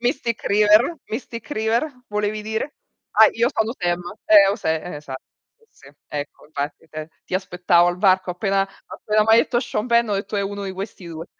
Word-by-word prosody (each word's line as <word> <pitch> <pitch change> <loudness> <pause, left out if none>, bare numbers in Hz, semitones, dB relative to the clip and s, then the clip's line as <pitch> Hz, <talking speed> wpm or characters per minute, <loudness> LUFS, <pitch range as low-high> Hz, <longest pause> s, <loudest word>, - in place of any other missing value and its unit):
Mystic 240 -2 -1
River, 210 +9 +4
Mystic 230 +2 -6
River 225 0 +1 0.2
volevi 210 0 -2
dire? 220 +7 -3 0.4
Ah, 220 +1 +7
Io 235 +2 +2
sono 220 -1 0
Sam, 175 -1 0 0.3
ehm, 200 -2 +7
o - - -4
Sa 160 - -2 0.3
esatto, 135 -3 -8 0.3
sì 460 - -29 0.2
sì, - - -18 0.2
ecco 145 0 -6
infatti, 145 +1 -5
t 155 +1 -7 0.2
ti - - -6
aspettavo 180 -2 +2
al 175 - -2
varco 185 -1 +3
appena 195 +1 0 0.2
appena 215 0 0
m'hai 225 +1 +6
detto 240 +1 +2
Sean 230 -3 -3
Penn 235 -1 +3
ho 205 - 0
detto: 200 +1 -3
"È - - +1
uno 200 0 -4
di 190 - -4
questi 190 -1 -7
2". 165 0 -7
205 Hz, 190 wpm, -22 LUFS, 180-220 Hz, 0.4 s, Ah